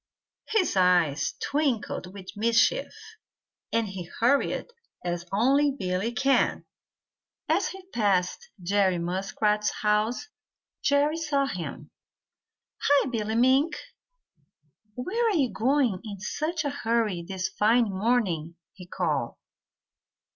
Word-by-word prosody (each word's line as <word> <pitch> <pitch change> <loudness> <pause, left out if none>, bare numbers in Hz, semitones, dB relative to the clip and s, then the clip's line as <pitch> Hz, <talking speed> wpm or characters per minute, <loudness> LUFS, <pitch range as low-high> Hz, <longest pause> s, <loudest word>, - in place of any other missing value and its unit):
His 435 - +1
eyes 175 -6 +3
twinkled 270 -10 -1
with 190 -1 -10
mischief, 230 - +2 0.8
and 230 -1 +1
he 190 -3 -6
hurried 255 +5 +2 0.4
as 175 0 -3
only 270 +8 +3
Billy 185 +2 -1
can. 270 +3 +1 0.8
As - - +2
he 380 -1 -9
passed 205 - 0
Jerry 190 0 +2
Muskrat's 195 +4 0
house, 215 - +1 0.5
Jerry 290 +2 +2
saw 295 -4 0
him. 180 -10 -6 0.9
"Hi, 285 -1 +3
Billy 220 -2 -2
Mink! 265 +6 +3 1.2
Where 445 - -1
are 430 - +1
you 265 -5 +1
going 250 -5 +1
in 205 -3 -7
such 310 - -2
a 285 - 0
hurry 230 -8 0
this 190 +1 -3
fine 215 +3 +2
morning?" 190 -6 0 0.2
he 180 -2 -12
called. 155 -10 -1
220 Hz, 110 wpm, -27 LUFS, 185-275 Hz, 1.2 s, eyes